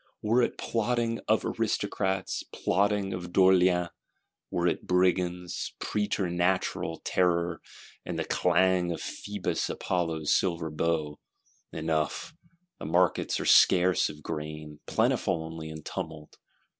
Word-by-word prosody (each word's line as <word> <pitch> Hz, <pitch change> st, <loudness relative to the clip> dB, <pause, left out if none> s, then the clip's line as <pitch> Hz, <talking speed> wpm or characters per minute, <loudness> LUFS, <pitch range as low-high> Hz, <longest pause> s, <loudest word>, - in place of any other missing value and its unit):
Were 115 Hz, +4 st, +3 dB
it 120 Hz, -, 0 dB
plotting 115 Hz, 0 st, -1 dB
of -, -, +2 dB
Aristocrats, 95 Hz, -1 st, -1 dB
plotting 100 Hz, 0 st, +1 dB
of 90 Hz, -1 st, -6 dB
d'Orléans; 90 Hz, -2 st, +4 dB, 0.6 s
were 85 Hz, -, -1 dB
it 85 Hz, -, 0 dB
Brigands, 90 Hz, -1 st, 0 dB
preternatural 90 Hz, -4 st, -1 dB
terror, 85 Hz, -2 st, +1 dB, 0.4 s
and -, -, -5 dB
the -, -, -1 dB
clang 90 Hz, -2 st, +2 dB
of 85 Hz, -, -4 dB
Phoebus 100 Hz, -2 st, -3 dB
Apollo's 80 Hz, -4 st, -1 dB
silver 85 Hz, -4 st, 0 dB
bow,—enough, 80 Hz, -, -3 dB, 0.5 s
the -, -, -6 dB
markets 85 Hz, +3 st, +1 dB
are -, -, -3 dB
scarce 90 Hz, -1 st, +5 dB
of 75 Hz, 0 st, -11 dB
grain, 75 Hz, -1 st, -6 dB
plentiful 80 Hz, -, +1 dB
only 80 Hz, -1 st, -7 dB
in 80 Hz, -1 st, -8 dB
tumult. 75 Hz, -1 st, -6 dB
90 Hz, 110 wpm, -28 LUFS, 80-95 Hz, 0.6 s, scarce